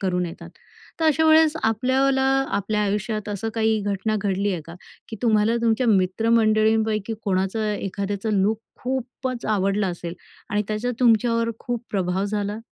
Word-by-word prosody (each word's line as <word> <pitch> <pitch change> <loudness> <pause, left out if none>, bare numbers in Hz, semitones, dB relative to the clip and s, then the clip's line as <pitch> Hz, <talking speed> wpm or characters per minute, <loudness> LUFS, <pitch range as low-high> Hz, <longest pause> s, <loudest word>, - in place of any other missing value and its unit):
करून 180 -2 0
येतात. 165 - -9 0.5
तर - - +1
अशा 320 0 +3
वेळेस 315 -1 +6
आपल्याला 260 +4 +2 0.3
आपल्या 210 +1 -1
आयुष्यात 210 +1 -2
असं 205 +2 -3
काही 220 -1 +2
घटना 205 +2 -1
घडली 200 0 0
आहे 175 - -3
का? 165 - -9 0.3
की 220 - -6
तुम्हाला 220 0 +3
तुमच्या 230 +2 +2
मित्रमंडळींपैकी 220 +1 +2
कोणाचं 195 +2 0
एखाद्याचं 200 +1 -2
लूक 215 +2 +1 0.2
खूपच 255 -1 -4
आवडलं 200 -1 +1
असेल 175 0 -6 0.4
आणि 210 -1 +1
त्याचा 215 +3 -1
तुमच्यावर 230 -1 +3
खूप 240 -1 -4
प्रभाव 190 0 0
झाला? 205 +1 -2
215 Hz, 140 wpm, -23 LUFS, 200-230 Hz, 0.5 s, वेळेस